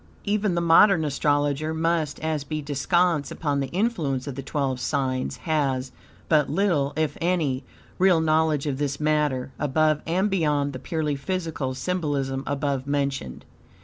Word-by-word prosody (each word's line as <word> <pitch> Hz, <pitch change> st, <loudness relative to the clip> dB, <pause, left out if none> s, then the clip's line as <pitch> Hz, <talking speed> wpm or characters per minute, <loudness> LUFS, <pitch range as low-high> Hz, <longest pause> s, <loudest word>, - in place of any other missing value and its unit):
Even 205 Hz, -2 st, 0 dB
the 170 Hz, -, +1 dB
modern 170 Hz, 0 st, +5 dB
astrologer, 145 Hz, +1 st, 0 dB
much 160 Hz, -2 st, 0 dB
as 155 Hz, -2 st, -1 dB
be 155 Hz, +1 st, -4 dB
descants 150 Hz, +2 st, +1 dB
upon 145 Hz, -3 st, -1 dB
the 135 Hz, -, -1 dB
influence 160 Hz, -, -1 dB
of 140 Hz, -, -4 dB
the 135 Hz, -, -5 dB
twelve 135 Hz, -1 st, -2 dB
signs, 130 Hz, -1 st, -1 dB
has 135 Hz, -5 st, 0 dB, 0.4 s
but 150 Hz, -3 st, +3 dB
little, 155 Hz, -4 st, +1 dB
if 155 Hz, -1 st, -1 dB
any, 160 Hz, -7 st, 0 dB, 0.4 s
real 185 Hz, -3 st, +5 dB
knowledge 155 Hz, -2 st, +2 dB
of 140 Hz, -2 st, -2 dB
this 140 Hz, -1 st, -2 dB
matter 150 Hz, -4 st, 0 dB
above 155 Hz, +1 st, +2 dB
and 185 Hz, +5 st, +1 dB
beyond 150 Hz, -6 st, +1 dB
the 130 Hz, -, -6 dB
purely 155 Hz, -1 st, -2 dB
physical 155 Hz, -4 st, -3 dB
symbolism 140 Hz, -4 st, -2 dB
above 140 Hz, -1 st, -1 dB
mentioned. 140 Hz, -, -2 dB
150 Hz, 145 wpm, -25 LUFS, 140-165 Hz, 0.4 s, modern